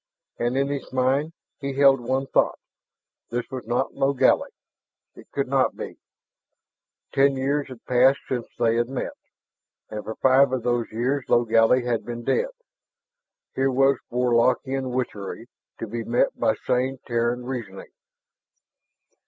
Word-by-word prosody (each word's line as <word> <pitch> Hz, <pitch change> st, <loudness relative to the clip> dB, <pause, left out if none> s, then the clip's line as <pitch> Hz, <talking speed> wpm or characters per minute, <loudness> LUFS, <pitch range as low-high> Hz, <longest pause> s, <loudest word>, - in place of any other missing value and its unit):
And 120 Hz, +2 st, 0 dB
in 140 Hz, 0 st, +1 dB
his 140 Hz, -1 st, -4 dB
mind 130 Hz, +4 st, +1 dB, 0.3 s
he 140 Hz, 0 st, -3 dB
held 135 Hz, -1 st, +5 dB
one 130 Hz, +3 st, -1 dB
thought: -, -, +1 dB, 0.7 s
this 120 Hz, +1 st, -2 dB
was 130 Hz, -4 st, -6 dB
not 120 Hz, +3 st, 0 dB
Logally; 135 Hz, -1 st, +2 dB, 0.6 s
it -, -, -15 dB
could -, -, -1 dB
not -, -, +1 dB
be. -, -, -7 dB, 1.1 s
Ten 135 Hz, 0 st, +4 dB
years 140 Hz, +2 st, 0 dB
had 130 Hz, -3 st, -12 dB
passed 130 Hz, +2 st, +4 dB
since 125 Hz, -3 st, -3 dB
they 115 Hz, -1 st, +2 dB
had 120 Hz, +1 st, 0 dB
met. 135 Hz, -, -4 dB, 0.8 s
And 105 Hz, -1 st, -5 dB
for 110 Hz, -, -6 dB
five 130 Hz, 0 st, +4 dB
of 130 Hz, -3 st, -1 dB
those 120 Hz, -1 st, 0 dB
years 125 Hz, +4 st, -1 dB
Logally 120 Hz, +1 st, +4 dB
had 120 Hz, -2 st, 0 dB
been 120 Hz, 0 st, -6 dB
dead. 485 Hz, -, +1 dB, 1.0 s
Here 135 Hz, 0 st, +1 dB
was 135 Hz, +1 st, +3 dB
Warlockian 125 Hz, +2 st, +1 dB
witchery, 115 Hz, -4 st, -4 dB, 0.3 s
to -, -, -4 dB
be 115 Hz, +1 st, -4 dB
met 120 Hz, +2 st, +2 dB
by -, -, +1 dB
sane 130 Hz, +2 st, 0 dB
Terran 120 Hz, +1 st, -1 dB
reasoning. 115 Hz, -7 st, -6 dB
125 Hz, 140 wpm, -24 LUFS, 120-135 Hz, 1.1 s, held